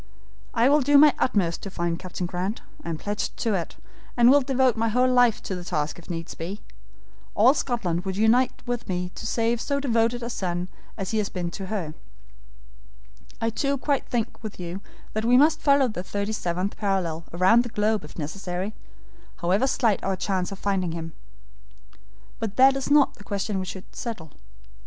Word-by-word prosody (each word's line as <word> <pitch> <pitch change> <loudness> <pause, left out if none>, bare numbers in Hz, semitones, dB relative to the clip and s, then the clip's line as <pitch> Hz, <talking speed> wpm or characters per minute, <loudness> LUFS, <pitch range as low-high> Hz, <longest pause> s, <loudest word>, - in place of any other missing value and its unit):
I 235 - +4
will 290 +2 +5
do 285 +2 +5
my 295 0 +8
utmost 180 -9 +1
to 195 - -6
find 170 -2 -2
Captain 185 -1 -5
Grant; 185 +5 -3 0.2
I - - -5
am 165 - -2
pledged 205 +5 -3
to 225 - 0
it, 175 -4 -3 0.4
and 240 +1 +7
will 285 +1 +6
devote 260 -2 +2
my 225 0 +1
whole 250 +3 +3
life 245 -3 +3
to - - -4
the 180 -1 -5
task 150 -2 -2
if 170 - -15
needs 165 -1 -5
be. 185 +6 -6 0.7
All 240 +6 +6
Scotland 200 - -1
would 190 0 -3
unite 235 +4 +3
with 240 -3 -3
me 180 -1 -2
to - - -6
save 230 0 0
so 280 -1 -1
devoted 235 -2 +1
a 235 - -3
son 180 -3 -3 0.3
as 195 -3 -3
he 220 - +1
has 205 - -1
been 175 -2 -3
to 195 0 -6
her. 185 -7 -3 1.5
I 225 0 0
too 275 +5 0
quite 275 +1 -1
think 235 -2 -2
with 215 -4 -7
you 180 +2 -5 0.3
that 220 - -1
we 245 +2 +5
must 310 +3 +4
follow 280 -2 +4
the 215 -6 -4
thirty 200 +3 -3
seventh 185 -2 -2
parallel 180 -6 -1
round 185 +7 +5
the 240 - -5
globe 215 -2 0
if 150 - -12
necessary, 180 +5 -4 0.6
however 190 +8 +1
slight 230 -6 +1
our 195 0 0
chance 185 0 -1
of 195 - -6
finding 190 -4 -1
him. 165 -1 -6 1.3
But 215 -2 -3
that 265 +1 +6
is 270 0 -3
not 290 -1 +4
the - - -11
question 200 0 -2
we 185 - -4
have - - -4 0.2
to - - -10
settle. 195 - -6
210 Hz, 195 wpm, -25 LUFS, 180-245 Hz, 1.5 s, my